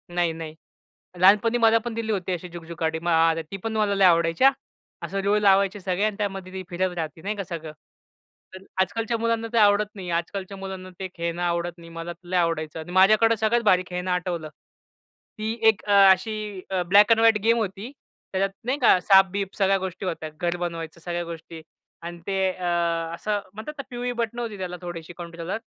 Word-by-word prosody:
नाही, 175 -2 +1
नाही. 160 -1 -8 0.6
लहानपणी 210 +5 +5
मला 230 -1 +5
पण 240 - -3
दिली 225 -1 -3
होती 190 -3 -2
अशी 180 0 -5
झगझुक 170 -1 -8
गाडी. 160 0 0 0.5
ती 195 - -4
पण 225 -1 -3
मला 210 -2 +1
लई 195 -1 +4
आवडायची 165 +3 +3
हां. 270 - +8 0.5
असं 195 - -3
रुळ 200 +1 +3
लावायचे 200 0 +3
सगळे 185 +1 -1
आणि 215 -1 -1
त्यामध्ये 195 -3 -4
ते 190 - -4
फिरत 185 +1 -1
राहते 160 -1 -5
नाही 205 +4 -3
का 200 - -4
सगळं. 165 -3 -7 0.8
तर 190 0 -10 0.2
आजकालच्या 225 +5 -1
मुलांना 230 0 -1
ते - - +1
आवडत 210 0 +4
नाही. 185 -3 -7
आजकालच्या 185 +3 -3
मुलांना 190 -1 -7
ते 190 - -3
खेळणं 170 0 -3
आवडत 170 0 0
नाही. 165 -1 -13
मला 165 +1 -6
लय 180 +1 -2
आवडायचं 165 -2 -1
आणि 160 +2 -8
माझ्याकडे 215 +5 +5
सगळ्यात 220 +3 +1
भारी 185 -3 +4
खेळणं 180 +1 -3
आठवलं. 175 -3 -2 0.9
ती 215 +1 -2
एक 220 -3 +4
अ, 205 - -1 0.2
अशी 210 0 -2 0.3
ब्लॅक 205 +4 +6
एंड 225 - +5
व्हाईट 225 -1 +5
गेम 230 +1 +4
होती. 205 +2 -4 0.4
त्याच्यात 195 +1 +1
नाही 255 +4 -1
का, 235 -7 +5
साप-बीप 195 0 +3
सगळ्या 195 -1 +3
गोष्टी 190 0 -5
होत्या. 165 -3 -4
घर 175 0 0
बनवायचं, 170 -1 -5
सगळ्या 175 0 -3
गोष्टी 165 -1 -9 0.4
आणि 170 0 -7
ते 195 -1 -1
अ, 185 -1 -7 0.5
असं 205 +4 -2
म्हणतात 220 +8 -7
ना, 275 - -5
पिवळी 245 0 -3
बटन 235 +1 -3
होती 230 -4 -4
त्याला 180 -1 -5
थोडीशी 175 -1 -7
कंट्रोलर 170 +1 -5
190 Hz, 190 wpm, -24 LUFS, 175-210 Hz, 0.9 s, हां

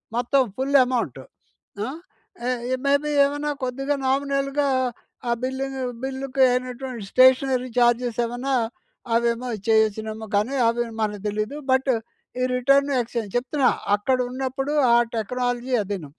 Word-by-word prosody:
మొత్తం 245 +3 +2 0.2
full 275 +2 +3
amount. 235 - -2 0.7
ఆ! - - -4 1.0
Maybe 285 +2 +2 0.2
ఏమన్నా 290 +1 -2
కొద్దిగా 270 +3 -1
నామినల్‌గా 275 +1 0 0.6
ఆ - - +2
బిల్లును 265 +1 -3 0.2
బిల్లుకి 265 0 0
అయినవంటి 250 -2 -3
స్టేషనరీ 255 0 +4
ఛార్జెస్ 240 0 +2
ఏమన్నా 245 +4 -3 0.6
అవేమో 235 +1 0 0.2
చేసినెమొ 220 0 +1
కానీ, 215 +7 +1
అవి 235 +1 +1 0.2
మనకి 210 -2 -2
తెలీదు. 215 +6 -2
బట్ 265 +1 +3 0.5
ఈ - - +2
రిటర్న్, 275 +3 +3
ఎక్స్‌చెంజ్ 230 -3 -5
చెప్తున్నా 260 +1 +2 0.3
అక్కడ 255 +6 0
ఉన్నప్పుడు 270 +2 -3 0.2
ఆ - - +7 0.2
టెక్నాలజీ 245 +3 -2
అదీను. 190 -7 -5
255 Hz, 115 wpm, -23 LUFS, 235-270 Hz, 1.0 s, ఆ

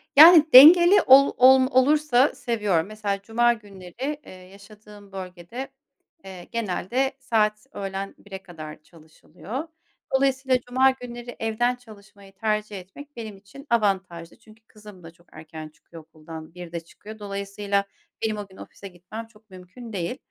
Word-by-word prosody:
Yani, 315 +1 +9
dengeli 345 +8 +9
ol 275 +2 +6
olm 260 +1 +6
olursa 275 0 +2
seviyorum. 205 -7 -1
Mesela, 205 -2 -4
cuma 240 +3 +1
günleri, 215 - -8
eee, - - -13
yaşadığım 200 +2 -16
bölgede, 185 +7 -8 0.6
eee, 185 -2 -10
genelde 235 +4 -2
saat 215 -4 -1
öğlen 195 0 -6
1'e 195 -1 -11
kadar 155 -4 -11
çalışılıyor. 165 - -10 0.5
Dolayısıyla 265 -1 +1
cuma 260 +2 +3
günleri 245 -1 -10
evden 230 +3 -1
çalışmayı 200 -4 -17
tercih 210 0 -3
etmek 285 +11 -14
benim 220 -4 -8
için 205 +9 -15
avantajlı. 190 -7 -2
Çünkü 220 0 -21
kızım 210 -4 -16
da 165 - -12
çok 175 +1 -28
erken 155 0 -11
çıkıyor 160 +2 -16
okuldan, 160 +1 -12
1'de 175 -1 -7
çıkıyor. 210 +6 -14
Dolayısıyla 200 0 -3 0.4
benim 215 -1 -2
o 205 -1 -7
gün 190 - -19
ofise 200 - -12
gitmem 190 +5 -10
çok 220 -1 -25
mümkün 185 +6 -13
değil 190 +6 -4
210 Hz, 140 wpm, -23 LUFS, 185-245 Hz, 0.6 s, Yani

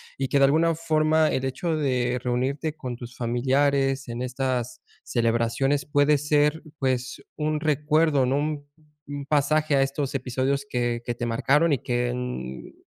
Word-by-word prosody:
Y 135 -1 -2
que 140 - +1
de 140 - +6
alguna 160 +4 +3
forma 155 -1 +2
el 130 - -1
hecho 160 +5 -2
de 125 -4 0
reunirte 135 +5 -1
con 125 -5 -6
tus 120 +1 -10
familiares 135 +3 +1
en 120 +1 -4
estas 125 -1 -2 0.2
celebraciones 120 +4 0
puede 145 0 +3
ser, 150 +1 +2 0.2
pues, 130 -2 -1 0.2
un 155 0 -1
recuerdo, 150 -1 +2
¿no? 135 +2 +1
Un 150 -1 -2 0.4
un 145 -1 -5
pasaje 150 +1 +1
a 135 - +4
estos 135 0 -1
episodios 135 +2 -1
que 120 -1 -1
que 120 0 -3
te 120 - -3
marcaron 140 +7 +2
y - - +2
que 120 0 -1
en, 125 - -5
135 Hz, 160 wpm, -25 LUFS, 125-150 Hz, 0.4 s, de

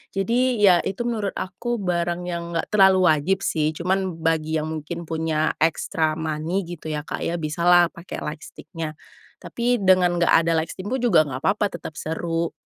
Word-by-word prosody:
Jadi, 240 +6 +1
ya, 180 -3 +7
itu 195 +6 -3
menurut 220 -4 -2
aku 215 +6 -3
barang 175 -1 -1
yang 170 0 -5
nggak 165 - -2
terlalu 190 -4 +5
wajib 170 +6 0
sih, 155 -1 0
cuman 180 -1 -2
bagi 160 -1 0
yang 155 0 -2
mungkin 160 +2 -5
punya 160 -1 -1
extra 160 0 +1
money 160 +4 -2
gitu 170 -2 -8
ya, 150 -1 -3
Kak, - - -5
ya, 170 - -1
bisalah 170 +2 +3
pakai 170 +2 -8
lightstick-nya. 155 +1 -7 0.5
Tapi 240 -2 -1
dengan 185 -2 +4
nggak 170 -1 +2
ada 165 0 +4
lightstick 185 +4 -8
pun 255 +2 -2
juga 175 -10 +4
nggak 135 -1 -6
papa, 205 +1 +2
tetap 175 -4 -8
seru. 165 +1 -3
170 Hz, 170 wpm, -23 LUFS, 160-190 Hz, 0.5 s, ya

